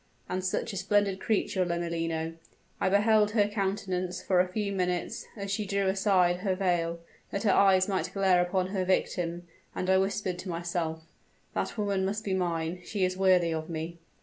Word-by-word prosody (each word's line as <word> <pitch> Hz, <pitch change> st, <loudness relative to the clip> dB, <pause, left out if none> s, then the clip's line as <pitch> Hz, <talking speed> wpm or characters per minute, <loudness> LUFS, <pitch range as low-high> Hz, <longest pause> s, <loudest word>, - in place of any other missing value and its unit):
And 185 Hz, 0 st, -2 dB
such 190 Hz, +4 st, -1 dB
a -, -, -4 dB
splendid 195 Hz, 0 st, +1 dB
creature, 195 Hz, -3 st, 0 dB
Lomellino! 165 Hz, -2 st, -2 dB, 0.5 s
I -, -, +2 dB
beheld 210 Hz, +1 st, +4 dB
her 205 Hz, -3 st, +4 dB
countenance 190 Hz, -3 st, -2 dB
for 185 Hz, -2 st, +1 dB
a 180 Hz, -, +4 dB
few 200 Hz, +2 st, -2 dB
minutes, 180 Hz, -2 st, -2 dB
as 200 Hz, -1 st, -4 dB
she 210 Hz, +2 st, 0 dB
drew 200 Hz, 0 st, 0 dB
aside 190 Hz, -2 st, +3 dB
her 190 Hz, 0 st, -1 dB
veil 175 Hz, -3 st, 0 dB, 0.3 s
that 200 Hz, -, -3 dB
her 205 Hz, -, +4 dB
eyes 190 Hz, -1 st, +5 dB
might 185 Hz, -3 st, -1 dB
glare 190 Hz, -2 st, +3 dB
upon 180 Hz, +1 st, 0 dB
her 190 Hz, -1 st, -1 dB
victim; 175 Hz, -2 st, -1 dB, 0.3 s
and 185 Hz, +1 st, 0 dB
I 190 Hz, -, +5 dB
whispered 195 Hz, -2 st, -1 dB
to 185 Hz, -, -6 dB
myself, 170 Hz, -1 st, -3 dB, 0.5 s
'That -, -, -2 dB
woman 200 Hz, -2 st, 0 dB
must 205 Hz, +3 st, -2 dB
be 195 Hz, -, -1 dB
mine; 175 Hz, -1 st, -1 dB
she 195 Hz, 0 st, 0 dB
is 185 Hz, 0 st, -1 dB
worthy 185 Hz, -3 st, +3 dB
of 160 Hz, 0 st, -4 dB
me!' 165 Hz, +1 st, -5 dB
185 Hz, 180 wpm, -29 LUFS, 175-200 Hz, 0.5 s, eyes